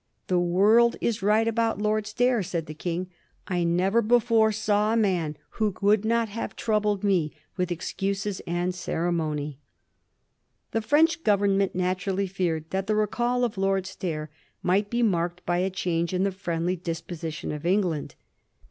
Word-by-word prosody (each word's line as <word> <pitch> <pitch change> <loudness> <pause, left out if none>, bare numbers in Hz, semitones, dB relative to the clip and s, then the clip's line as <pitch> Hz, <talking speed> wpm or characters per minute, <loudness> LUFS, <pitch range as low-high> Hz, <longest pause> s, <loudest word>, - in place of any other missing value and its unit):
^ - - -46
The 180 -1 +3
world 205 +7 +4
is 230 -4 -1
right 215 +3 +3
about 230 -2 +1
Lord 215 0 0
Stair,' 245 +2 +2
said 170 -3 -3
the 155 - -7
King; 175 +3 -4 0.2
* - - -40
I 175 - +1
never 185 +6 +2
before 225 -1 +3
saw 215 0 +1
a - - +2
man 175 -8 0 0.2
who 210 -3 +1
would 205 +1 +3
not 230 0 +2
have 220 +2 -5
troubled 210 -3 0
me 180 -7 +1 0.2
with 180 -2 -1
excuses 195 +3 -2
and 175 +1 -1
ceremony.' 155 -5 -2 1.1
The 225 - 0
French 320 +8 +3
Government 200 -2 +2
naturally 185 +2 0
feared 170 -4 -2
that 190 0 -2
the 215 - +1
recall 240 +4 +1
of 220 -5 -1
Lord 195 -1 +1
Stair 155 -5 -4 0.3
might 200 +3 +2
be 240 +1 0
marked 175 -3 0
by 175 0 +1
a 185 +1 +1
change 175 -2 -1
in 185 - +1
the 200 - +1
friendly 180 -2 -2
disposition 165 -2 -5
of 150 -1 -5
England. 175 -4 0
195 Hz, 165 wpm, -26 LUFS, 175-215 Hz, 1.1 s, world